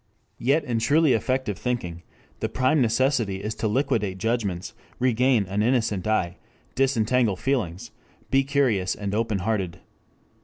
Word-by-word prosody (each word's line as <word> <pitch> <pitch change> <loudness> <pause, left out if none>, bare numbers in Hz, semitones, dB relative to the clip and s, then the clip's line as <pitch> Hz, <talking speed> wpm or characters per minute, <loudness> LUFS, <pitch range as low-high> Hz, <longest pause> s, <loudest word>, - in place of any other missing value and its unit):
Yet 140 +6 +2
in 120 -4 -1
truly 145 +5 +3
effective 125 -2 -1
thinking 90 -9 -3 0.4
the - - -2
prime 130 +3 +2
necessity 115 -4 +1
is 105 +1 -2
to 110 - -2
liquidate 110 -5 0
judgments, 110 -3 -2 0.2
regain 125 -2 +2
an 100 +3 -1
innocent 110 -5 +1
eye, 90 -5 0 0.4
disentangle 125 -4 +2
feelings, 110 -3 -2 0.4
be 135 0 +4
curious 130 -9 +1
and 100 -1 -4
open 110 -1 0
hearted. 95 -6 -1
115 Hz, 130 wpm, -25 LUFS, 100-130 Hz, 0.4 s, be